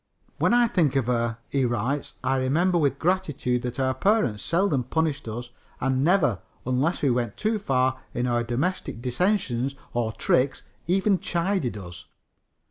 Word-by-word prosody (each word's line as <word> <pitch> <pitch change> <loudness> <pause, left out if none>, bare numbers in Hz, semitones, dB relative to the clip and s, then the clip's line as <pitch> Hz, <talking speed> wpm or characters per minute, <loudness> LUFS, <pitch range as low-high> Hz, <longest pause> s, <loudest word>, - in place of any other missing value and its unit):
"When - - +3
I 240 0 +5
think 155 - +1
of 135 -4 +2
her," 120 -2 0
he 135 -1 0
writes, 125 +4 -1
"I 135 - +1
remember 165 +8 +2
with 145 -3 +1
gratitude 150 -9 0
that 125 +1 -4
our 130 0 +2
parents 130 - +1
seldom 170 - +1
punished 155 +1 -1
us, 120 +2 -6 0.3
and 130 0 +1
never, 150 - +3 0.3
unless 130 +8 0
we 140 - +4
went 120 -3 -1
too 215 0 0
far 130 -6 +1
in 120 - -1
our 120 -1 +1
domestic 130 +5 -2
dissensions 135 - 0 0.2
or 120 -2 0
tricks, 130 +4 +1 0.2
even 190 +2 +2
chided 170 - -1
us. 90 -3 -9
130 Hz, 155 wpm, -25 LUFS, 120-175 Hz, 0.3 s, I